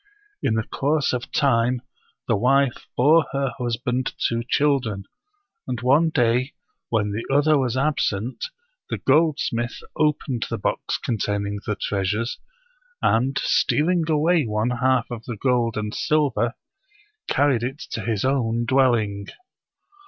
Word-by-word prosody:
In 110 - +1
the 110 - 0
course 145 +5 0
of 125 +2 -4
time 125 -2 +2 0.4
the - - +2
wife 130 +4 +2
bore 150 +4 +5
her 135 -2 -1
hus 120 -2 -1
band 125 +1 -2
two 115 0 0
children; 130 -9 +1 0.6
and 125 -2 -3
one 140 +7 +4
day, 125 -1 +1 0.4
when 105 -3 0
the 110 +3 -3
other 145 +2 +4
was 130 -1 -1
ab 150 +3 +1
sent, 110 +6 -2 0.4
the - - -2
goldsmith 135 -5 +1 0.2
opened 150 -5 0
the - - -2
box - - -2
containing 100 -2 -2
the 105 - 0
treas 100 0 -1
ures, 115 +2 -3 0.7
and, 130 +4 +2
stealing 170 +2 +2
away 160 +2 +3
one 110 +3 0
half 130 0 +2
of 115 -2 -6
the 120 -3 -5
gold 120 -1 +1
and 105 0 -3
silver, 135 -6 +1 0.7
carried 140 -5 +2
it 130 +3 -3
to 110 - -3
his 110 +1 -1
own 120 -3 +1
dwelling. 115 -6 +2
125 Hz, 140 wpm, -23 LUFS, 115-140 Hz, 0.7 s, bore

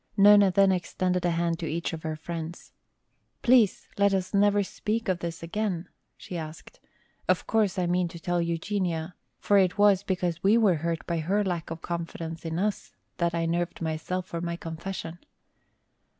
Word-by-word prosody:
Nona 205 0 +7
then 195 +1 +4
extended 180 0 -1
a - - +3
hand 170 0 0
to 165 - -3
each 170 +2 -2
of 160 - -5
her 155 -1 -3
friends. 165 +1 -7 0.7
"Please 240 -5 +4
let 200 -1 +4
us 185 +1 -2
never 205 0 +4
speak 215 +3 -3
of 185 -2 +1
this 170 -1 -5
again," 180 -1 -2 0.3
she 175 - -6
asked. 155 0 -9 0.5
"Of - - +2
course, 215 -4 +1
I 180 - +1
mean 175 0 +1
to 170 0 -9
tell 175 +1 0
Eugenia, 170 0 -2 0.2
for 205 -1 +3
it 185 -2 +2
was 205 -2 +5
because 180 -4 -2
we 205 +4 +5
were 200 -7 +4
hurt 165 -1 -2
by 170 -1 -1
her 195 +6 +1
lack 175 -4 -3
of 165 0 -7
confidence 165 -1 -5
in 165 0 -2
us 205 +2 -2 0.2
that 170 -1 0
I 165 0 0
nerved 175 +1 -1
myself 165 +3 -3
for 170 -2 -5
my 170 0 -2
confession." 170 0 -6
175 Hz, 180 wpm, -27 LUFS, 165-195 Hz, 0.7 s, Nona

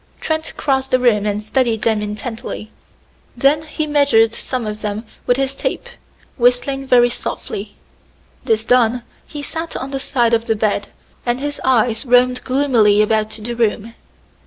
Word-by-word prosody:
Trent 315 0 -2
crossed 265 -2 0
the 255 - +4
room 220 -5 +2
and 210 0 -2
studied 230 -1 0
them 220 -2 +2
intently; 215 +1 -6 0.7
then 290 +2 +3
he 310 0 -2
measured 280 -7 +3
some 250 0 -3
of 210 0 -5
them 210 +1 -4 0.2
with 245 - +3
his 270 0 0
tape, 380 - -3 0.5
whistling 260 +2 +1
very 245 -2 +5
softly. 205 -3 -5 0.7
This 220 -1 +1
done, 245 0 +3 0.2
he 290 -1 -7
sat 325 +3 -5
on 265 +1 -5
the 270 - -2
side 240 -4 +1
of 230 0 +2
the 225 - +1
bed, 205 -1 0 0.4
and 240 +1 -1
his 290 +1 -4
eyes 240 -2 +2
roamed 250 0 +3
gloomily 240 -6 +3
about 215 0 +1
the 220 +2 -5
room. 230 -1 -1
240 Hz, 160 wpm, -18 LUFS, 220-270 Hz, 0.7 s, very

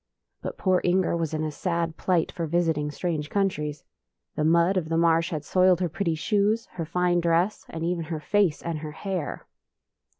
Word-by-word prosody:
But - - -5
poor 185 -2 +2
Inger 180 0 +2
was 165 -2 -1
in 155 0 -2
a 155 - -2
sad 170 0 -2
plight 175 -3 +1
foi 170 -2 -3
visiting 160 -3 +1
strange 150 -1 -3
countries. 150 -7 -1 0.5
The 150 - 0
mud 170 +4 +4
of 170 -4 -1
the 165 - +1
marsh 165 0 +3
had 155 -3 -4
soiled 185 0 +4
her 180 -2 0
pretty 165 0 -1
shoes, 210 +6 +1
her 165 -2 -4
fine 175 +2 +1
dress, 170 +4 +1
and 165 0 -5
even 170 -1 -1
her 160 -1 -4
face 190 0 +1
and 165 -2 -3
her 150 0 -7
hair. 185 -3 -4
170 Hz, 190 wpm, -26 LUFS, 155-180 Hz, 0.5 s, mud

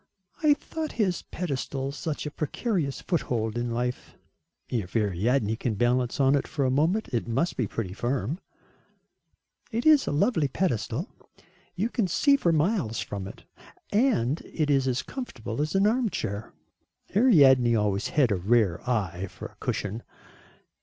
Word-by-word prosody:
"I 300 -2 +5
thought 315 +1 -5
his 190 -6 0
pedestal 135 -4 -3
such 150 +1 -4
a 150 - -4
precarious 155 - -2
foothold 115 - -1
in 120 0 -1
life." 125 +1 -3 0.5
"If 105 -5 -3
Ariadne 110 +3 +1
can 115 -2 -2
balance 120 +3 +1
on 135 0 +4
it 140 - +1
for 140 -3 -1
a 130 - +2
moment, 165 +11 +1
it 120 -2 -2
must 135 +9 0
be 120 - -1
pretty 95 -3 -4
firm." 125 - -2 1.3
"It 230 +1 -2
is 305 -3 +6
a - - 0
lovely 160 - +2
pedestal. 135 - -1 0.7
You 215 +6 -1
can 220 -6 +1
see 280 - +4
for 175 -11 +2
miles 155 - +1
from 100 -1 -4
it, - - -11 0.5
and 205 - +2
it 150 -3 -1
is 135 -2 +2
as 130 0 0
comfortable 135 - -5
as 155 +5 -2
an 195 +1 +4
armchair." 210 - -1 0.6
"Ariadne 135 - +6
always 105 -2 0
had 135 -7 +2
a - - +3
rare 100 -2 +2
eye 95 -6 -1
for - - -9
a - - -24
cushion." 105 +3 -3
135 Hz, 155 wpm, -27 LUFS, 115-180 Hz, 1.3 s, is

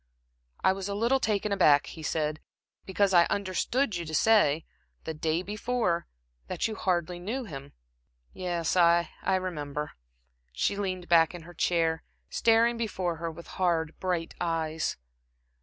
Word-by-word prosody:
"I 190 - +5
was 195 +1 -5
a 200 - -2
little 235 +6 +2
taken 210 -3 0
aback," 150 -7 +5
he 160 - -9
said, 155 -1 -1 0.5
"because 195 0 +2
I 170 -1 +7
understood 200 +4 0
you 170 - -4
to 155 0 -4
say 165 -7 +4 0.4
the 160 - -4
day 160 +3 -1
before 210 -4 -1 0.4
that - - -1
you 220 - -4
hardly 175 -4 -1
knew 225 +9 -3
him." 140 - -9 0.6
"Yes, 175 -3 -2
I 170 -1 +4
I - - +1
remember." 150 -5 -3 0.6
She 130 - 0
leaned 185 -3 -3
back 165 0 +4
in 170 - -9
her 175 +2 -12
chair, 165 -1 +1 0.3
staring 230 +1 +3
before 185 -7 -2
her 165 +1 -3
with 165 +1 -10 0.2
hard, 165 -3 +1
bright 180 -3 -2
eyes. 160 -2 -1
175 Hz, 150 wpm, -28 LUFS, 160-200 Hz, 0.6 s, I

